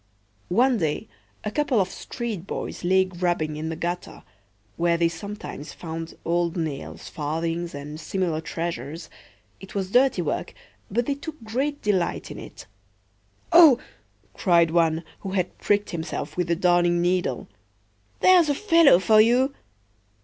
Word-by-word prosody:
One 245 +6 +3
day 160 +6 -1 0.4
a 210 - -3
couple 275 -2 +1
of 185 -1 0
street 220 -7 -5
boys - - -5
lay 190 +1 +4
grubbing 175 -4 -1
in 155 +1 -4
the 165 - -3
gutter, 175 +2 -5 0.5
where 170 0 +2
they 170 0 +3
sometimes 200 -4 -7
found 165 -1 -7
old 170 +1 0
nails, 155 -5 -5
farthings, 165 +2 -3
and 145 +2 -7
similar 170 -3 -2
treasures. 165 -1 -5 0.5
It 195 +1 -12
was 190 -1 -2
dirty 250 -6 +3
work, 150 - -3 0.3
but 235 +4 0
they 280 - 0
took 290 -1 -9
great 270 +7 -2
delight 190 -5 0
in - - -7
it."O!" 325 -7 +1 0.6
cried 170 -4 +3
one, 165 -1 +2 0.2
who 190 -1 -6
had 185 -2 -1
pricked 205 0 +1
himself 165 0 -4
with 180 -1 -1
the 170 - +2
Darning 175 0 +3
needle, 180 +1 0 0.7
"there's 360 -4 +6
a 290 - +2
fellow 330 - +6
for 215 +3 +5
you!" 250 +5 +3
180 Hz, 140 wpm, -24 LUFS, 165-220 Hz, 0.7 s, there's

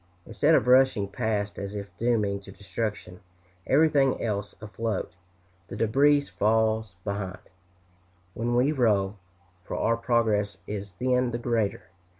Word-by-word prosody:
Instead 145 +9 +3
of - - +3
rushing 125 -5 +4
past 105 -1 -2
as 100 +1 -5
if 100 -1 -7
dooming 105 -4 +1
to 100 0 -13
destruction 100 -2 -5 0.5
everything 140 -2 +3
else 100 -3 -3
afloat, 110 -3 -4 0.5
the - - -7
debris 140 +6 +3
falls 110 -5 0
behind, 100 -3 -5 0.8
when 120 +2 -1
we 130 +4 +3
row, 105 -7 +1 0.5
for - - -5
our 115 - +2
progress 110 -4 +1
is 100 -2 -6
then 125 +5 +1
the 120 - -3
greater. 115 -4 -1
110 Hz, 130 wpm, -27 LUFS, 100-120 Hz, 0.8 s, rushing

